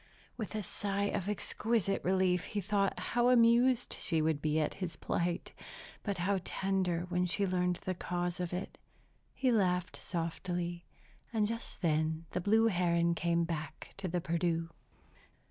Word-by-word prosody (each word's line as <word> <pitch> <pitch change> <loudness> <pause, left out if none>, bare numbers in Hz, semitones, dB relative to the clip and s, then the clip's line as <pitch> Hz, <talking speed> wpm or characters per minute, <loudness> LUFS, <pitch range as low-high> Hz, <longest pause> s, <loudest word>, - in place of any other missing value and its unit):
With 220 -2 -5
a 215 - -2
sigh 200 +1 -1
of 195 - -1
exquisite 210 0 0
relief 185 -1 +2
he 210 - -3
thought 200 0 +1
how 240 +1 +2
amused 245 +1 +5
she 165 -3 +1
would 155 -2 +1
be 155 +1 +1
at 155 - 0
his 170 -4 -3
plight, 175 0 -1 0.5
but 200 -3 -2
how 190 +2 +1
tender 185 -3 0
when 180 0 +1
she 200 +3 +2
learned 180 -1 +1
the 185 - -3
cause 175 0 -2
of 180 -1 -2
it. 180 +2 -5 0.6
He 260 -2 +2
laughed 185 -4 +1
softly; 175 0 -3 0.5
and 220 -3 +2
just 230 -2 -5
then 160 0 +1
the 180 - -1
blue 220 +4 +4
heron 170 -4 +2
came 170 0 +1
back 160 -2 -5
to 195 -1 -3
the 180 0 0
Perdu. 165 0 0
180 Hz, 155 wpm, -33 LUFS, 170-200 Hz, 0.6 s, amused